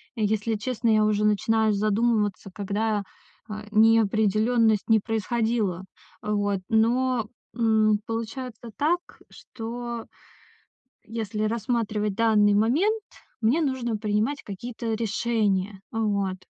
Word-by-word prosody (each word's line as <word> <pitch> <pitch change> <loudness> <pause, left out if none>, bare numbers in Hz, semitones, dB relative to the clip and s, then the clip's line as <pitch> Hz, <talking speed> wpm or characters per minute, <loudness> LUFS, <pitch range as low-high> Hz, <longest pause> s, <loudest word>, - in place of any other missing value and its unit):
если 220 0 0
честно, 230 +2 -1
я 215 -1 +4
уже 210 0 +1
начинаю 220 +1 +2
задумываться, 210 -1 0
когда, 205 +2 -1 0.5
э, - - -4 0.2
неопределённость 220 0 +3
не 220 -1 +6
происходила. 220 -3 -1 0.4
Вот, 205 -2 0
но, 235 +1 +2 0.3
м, 220 -2 +3
получается 230 +1 -5
так, 330 +5 +2 0.3
что 235 0 -7 1.0
если 215 -1 -3
рассматривать 215 -2 -1
данный 210 -2 +4
момент, 310 - +2 0.4
мне 240 +9 +3
нужно 260 -6 -1
принимать 215 +6 -1
какие-то 225 +3 -5
решения. 210 -3 -1
Вот, 200 -4 0
220 Hz, 100 wpm, -25 LUFS, 210-235 Hz, 1.0 s, не